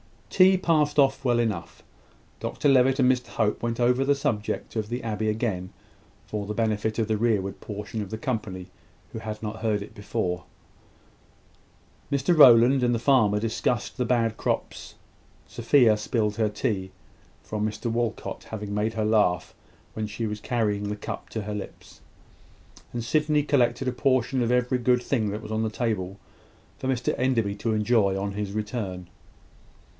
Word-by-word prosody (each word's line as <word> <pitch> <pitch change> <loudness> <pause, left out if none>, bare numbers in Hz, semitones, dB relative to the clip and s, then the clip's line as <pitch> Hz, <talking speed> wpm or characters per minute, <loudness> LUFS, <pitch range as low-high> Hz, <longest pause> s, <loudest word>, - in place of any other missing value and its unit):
Tea 190 0 +6
passed 155 -5 +1
off 135 -1 +3
well 120 -2 +2
enough. 110 -7 -2 0.6
Dr - - -2
Levitt 135 0 +4
and 130 -2 +5
Mr 125 -1 -2
Hope 105 -2 -1
went 115 0 -2
over 125 +2 +3
the 140 +1 +3
subject 110 -6 -2
of 110 -1 -2
the 120 +1 -4
abbey 110 -1 -1
again, 105 -5 -2 0.5
for 105 -2 -4
the 105 - -4
benefit 110 -1 0
of 110 -2 0
the 110 -1 0
rearward 105 -4 0
portion 105 +1 -6
of 100 - -6
the 110 - -4
company, 105 -7 -4 0.4
who - - -6
had 110 0 -6
not 110 +1 -4
heard 110 -2 -1
it 105 - -13
before. 100 -4 -3 1.7
Mr 140 +5 +2
Rowland 130 -2 +7
and 120 -1 +2
the - - +1
farmer 110 -5 +3
discussed 115 +1 -1
the 125 - 0
bad 115 -2 +1
crops. - - -3 0.5
Sophia 120 -1 +4
spilled 105 -1 -1
her 110 -2 +2
tea, 100 -5 -2 0.5
from 105 0 -2
Mr 110 +2 -4
Walcot 115 -1 -3
having 105 -2 -6
made 105 +2 0
her 110 -1 -1
laugh 105 -5 +2 0.4
when 110 -1 -3
she 115 +2 -4
was 105 -1 -3
carrying 105 -4 -1
the 105 - -2
cup 105 - -7
to 110 - -4
her 105 +1 -4
lips; 105 -1 -9 0.9
and 120 -1 -4
Sydney 150 +3 +2
collected 130 -3 +1
a - - +2
portion 130 0 +1
of 120 0 +1
every 125 +1 +1
good 125 0 +2
thing 115 -6 0
that 105 +3 -5
was 105 - -8
on 110 0 0
the 110 - 0
table 105 -5 -2 0.6
for 130 - -4
Mr 130 -2 0
Enderby 120 -6 +1
to 115 +1 -1
enjoy 105 -3 +2
on 100 +1 -2
his 100 0 -4
return. 105 -4 -4
110 Hz, 170 wpm, -26 LUFS, 105-125 Hz, 1.7 s, Rowland